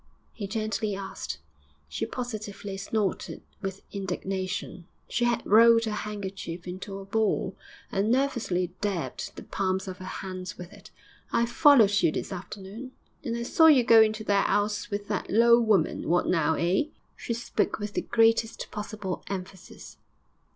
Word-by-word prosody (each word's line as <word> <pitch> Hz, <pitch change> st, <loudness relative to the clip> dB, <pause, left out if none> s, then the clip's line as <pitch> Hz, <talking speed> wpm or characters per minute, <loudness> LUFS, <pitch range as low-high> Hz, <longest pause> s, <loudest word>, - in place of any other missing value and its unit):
he 200 Hz, -, -5 dB
gently 215 Hz, -1 st, -2 dB
asked. 195 Hz, 0 st, -5 dB, 0.5 s
She 70 Hz, 0 st, -3 dB
positively 215 Hz, -5 st, -5 dB
snorted 200 Hz, 0 st, -2 dB, 0.2 s
with 195 Hz, -1 st, -5 dB
indignation; 190 Hz, -2 st, -4 dB, 0.2 s
she 240 Hz, -, 0 dB
had 240 Hz, -1 st, 0 dB
rolled 230 Hz, +2 st, +6 dB
her 220 Hz, -, -2 dB
handkerchief 195 Hz, -5 st, -5 dB
into 190 Hz, +2 st, -6 dB
a 195 Hz, -, -8 dB
ball, 220 Hz, +2 st, 0 dB, 0.4 s
and 200 Hz, +3 st, +1 dB
nervously 230 Hz, -9 st, 0 dB
dabbed 200 Hz, -5 st, -3 dB
the -, -, -8 dB
palms 190 Hz, 0 st, -1 dB
of 185 Hz, 0 st, -6 dB
her 185 Hz, -, -8 dB
hands 185 Hz, -1 st, -6 dB
with 180 Hz, -1 st, -9 dB
it. -, -, -14 dB, 0.4 s
'I 235 Hz, -, +3 dB
followed 240 Hz, -7 st, +5 dB
you -, -, +4 dB
this -, -, -4 dB
afternoon, 200 Hz, +7 st, -8 dB, 0.3 s
and 235 Hz, -1 st, -2 dB
I 235 Hz, -, -3 dB
saw 320 Hz, +7 st, +5 dB
you 280 Hz, -6 st, +7 dB
go 230 Hz, -2 st, +7 dB
into 215 Hz, 0 st, +2 dB
that 200 Hz, -2 st, +2 dB
'ouse 210 Hz, +2 st, 0 dB
with 205 Hz, -1 st, -4 dB
that -, -, -2 dB
low 235 Hz, +2 st, +6 dB
woman. 210 Hz, -10 st, +1 dB
What 175 Hz, +1 st, +3 dB
now? 160 Hz, -2 st, +2 dB
Eh?' 175 Hz, -, +1 dB, 0.3 s
She 235 Hz, -, -4 dB
spoke 235 Hz, -, -1 dB
with 205 Hz, -1 st, -5 dB
the -, -, 0 dB
greatest 225 Hz, -1 st, +2 dB
possible 210 Hz, -3 st, -5 dB
emphasis. 190 Hz, -1 st, -8 dB
205 Hz, 155 wpm, -27 LUFS, 190-225 Hz, 0.5 s, you